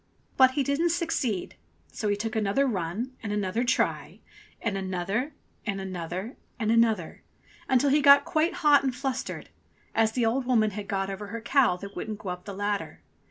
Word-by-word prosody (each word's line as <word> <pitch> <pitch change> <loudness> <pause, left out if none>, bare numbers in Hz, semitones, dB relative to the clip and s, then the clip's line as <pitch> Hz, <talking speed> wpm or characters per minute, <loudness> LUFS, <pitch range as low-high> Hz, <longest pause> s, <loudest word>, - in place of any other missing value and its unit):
But 260 -1 +6
he 280 - +3
didn't 280 +6 +1
succeed, 295 - -1 0.3
so 215 - -3
he 205 - +2
took 225 +3 -4
another 220 +5 +2
run 220 +3 -3
and 205 - -4
another 210 +2 0
try, 255 +1 0 0.4
and 225 -4 -2
another 195 - -2 0.3
and 200 -3 -3
another 185 +4 -5 0.2
and 220 -1 +1
another, 225 -7 +2 0.5
until 265 +1 +3
he 295 +1 +4
got 280 0 +7
quite 320 +2 +1
hot 290 -1 +7
and 260 -2 -1
flustered, 265 0 -4 0.4
as 220 0 +2
the 240 -1 +1
old 245 +3 0
woman 220 -4 +3
had 200 0 -6
got 195 0 -1
over 200 +2 -6
her 230 +3 -5
cow 240 -5 +3
that 200 +2 -9
wouldn't 215 -1 -4
go 200 -2 -7
up 180 0 -6
the 200 - -6
ladder. 205 0 -3
220 Hz, 180 wpm, -27 LUFS, 195-260 Hz, 0.5 s, got